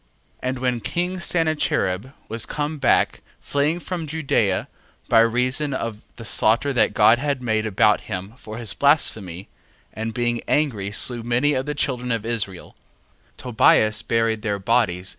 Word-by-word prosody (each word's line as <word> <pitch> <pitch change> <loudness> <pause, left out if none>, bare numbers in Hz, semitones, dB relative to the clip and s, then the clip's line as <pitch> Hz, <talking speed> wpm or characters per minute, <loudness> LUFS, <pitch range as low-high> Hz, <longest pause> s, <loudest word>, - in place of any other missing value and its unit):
1:21. 125 - -1
And 130 - -3
when 125 -2 0
king 180 +8 -2
Sennacherib 155 - 0 0.2
was 115 0 -2
come 150 +1 -3
back, - - +2 0.2
fleeing 145 +4 0
from 175 -2 -5
Judea 140 -11 0 0.4
by 115 - +5
reason 125 +5 +1
of 115 -4 -4
the 115 - -10
slaughter 115 +6 +2
that 125 - +2
God 120 +2 +5
had 140 -2 -2
made 110 -2 0
about 105 0 +3
him 95 +3 -5
for 110 -3 -9
his 115 -3 -4
blasphemy, 105 - +1 0.5
and 110 +1 -4
being 120 0 -1
angry 115 -10 0
slew 120 +3 0
many 120 +5 +1
of 130 +1 -2
the 150 - -2
children 125 -3 -2
of 115 -2 -2
Israel, 110 -6 -4 0.6
Tobias 110 -3 +3
buried 115 -1 0
their 105 -2 -1
bodies. 95 -3 0
120 Hz, 155 wpm, -22 LUFS, 110-140 Hz, 0.6 s, by